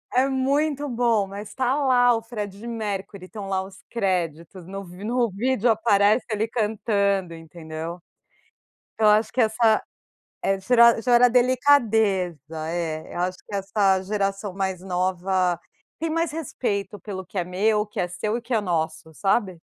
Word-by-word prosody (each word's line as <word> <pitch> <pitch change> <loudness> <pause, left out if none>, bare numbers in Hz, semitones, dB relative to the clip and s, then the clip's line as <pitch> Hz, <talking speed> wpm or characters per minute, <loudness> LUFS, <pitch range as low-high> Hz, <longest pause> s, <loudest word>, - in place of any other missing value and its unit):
é 260 +2 +4
muito 280 +2 0
bom, 235 -4 +1
mas 205 +1 -8
tá 260 0 +1
lá 250 -4 +4
o 225 - -2
Freddie 210 -2 -6
Mercury, 205 -4 -4
estão 205 -1 -7
lá 190 -1 0
os 190 0 -13
créditos 180 -4 -2
no 195 +2 -7
vi 180 +2 -11
no 240 +1 +1
vídeo 240 +3 +1
aparece 215 0 +3
ele 215 +1 0
cantando, 200 -5 0
entendeu? 165 +1 -7 1.0
Então 215 -1 +3
acho 215 +1 +3
que 255 - 0
essa 220 0 +3 0.6
eh, 195 0 +1
gera 235 +1 +5
gera 245 0 +5
delicadeza, 220 - +2
é, 160 -2 -4
eu 175 - -3
acho 185 +1 -1
que - - -7
essa 195 -1 +1
geração 200 0 -2
mais 190 -2 -2
nova 185 -1 0 0.4
tem 325 0 -2
mais 330 -1 0
respeito 210 -10 -3
pelo 190 0 -6
que 195 +2 -6
é 180 - 0
meu, 210 +4 +1
o - - -6
que 210 - -5
é 180 - -1
seu 210 +6 -2
e - - -10
que 240 +2 -7
é 220 - +3
nosso, 160 -3 -3
sabe? 195 -1 0
205 Hz, 160 wpm, -24 LUFS, 185-235 Hz, 1.0 s, gera